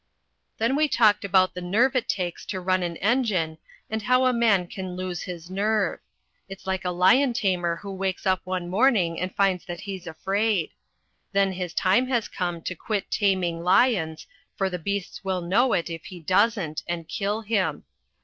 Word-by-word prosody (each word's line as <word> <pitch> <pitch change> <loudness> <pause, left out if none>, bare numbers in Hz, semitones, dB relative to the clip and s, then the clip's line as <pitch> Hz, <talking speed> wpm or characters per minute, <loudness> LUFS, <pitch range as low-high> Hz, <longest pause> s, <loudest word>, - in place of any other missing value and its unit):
Then 230 +4 +1
we 305 +1 +3
talked 220 -6 +3
about 185 -1 +3
the 180 - -6
nerve 225 +10 +2
it 255 - 0
takes 180 -3 -2
to 190 - -3
run 185 0 +1
an 170 -1 -2
engine, 200 -9 0 0.3
and 220 0 -3
how 255 +4 +3
a 255 - +3
man 220 -6 +3
can 185 0 -6
lose 185 -1 -4
his 170 -2 -7
nerve. 210 +1 0 0.5
It's 195 0 -10
like 190 0 -2
a 180 - -1
lion 190 +10 +4
tamer 180 -6 0
who 200 +3 -8
wakes 190 -1 -3
up 185 -1 +2
some 185 -1 -3
morning 190 -4 +2
and 185 0 -3
finds 195 -3 +2
that 175 -1 -6
he's 190 -3 -7
afraid. 195 +2 0 0.6
Then 195 -1 +3
his 180 -2 -5
time 195 +10 +3
has 240 -4 0
come 175 -3 -3
to - - -3
quit 200 +3 -3
taming 180 -4 +1
lions, 180 -4 +2 0.3
for 195 -2 -1
the 180 - -3
beasts 200 +3 -4
will 190 -1 -1
know 195 +9 +2
it 170 - 0
if 165 -1 -7
he 185 -3 -9
doesn't, 185 -1 +1
and 170 -2 -4
kill 205 +2 -2
him. 210 -3 -1
190 Hz, 185 wpm, -25 LUFS, 175-215 Hz, 0.6 s, lion